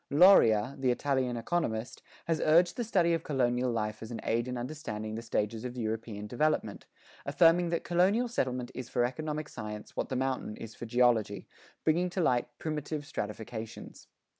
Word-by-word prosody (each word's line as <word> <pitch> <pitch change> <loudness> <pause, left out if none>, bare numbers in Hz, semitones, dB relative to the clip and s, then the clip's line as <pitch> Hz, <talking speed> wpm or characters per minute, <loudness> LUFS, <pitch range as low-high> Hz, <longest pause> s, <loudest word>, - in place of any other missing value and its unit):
Loria,[11:1] 135 - +5
the 130 - +2
Italian 130 -1 0
economist, 115 -4 -2 0.2
has 165 -1 0
urged 170 +3 +4
the 240 - -1
study 180 -7 +2
of 165 - 0
colonial 125 -3 +1
life 110 -2 -2
as 110 - -7
an 115 - -5
aid 115 +2 0
in 125 0 -3
understanding 120 -5 -5
the 115 - -4
stages 110 -1 -2
of 125 0 -5
European 110 -2 -3
development, 150 +8 -1 0.4
affirming 165 +5 +4
that 170 0 -1
colonial 190 +8 +2
settlement 125 - -2
is 130 -2 -6
for 120 - +2
economic 150 +3 -3
science 105 0 -7
what - - -2
the 130 - -2
mountain 130 -4 -2
is 110 -1 -8
for 120 - -8
geology, 115 -4 +2 0.4
bringing 175 +3 +2
to 180 - -4
light 125 -8 +2
primitive 150 -1 -4
stratifications. 110 -1 -6
125 Hz, 165 wpm, -30 LUFS, 115-155 Hz, 0.4 s, Loria,[11:1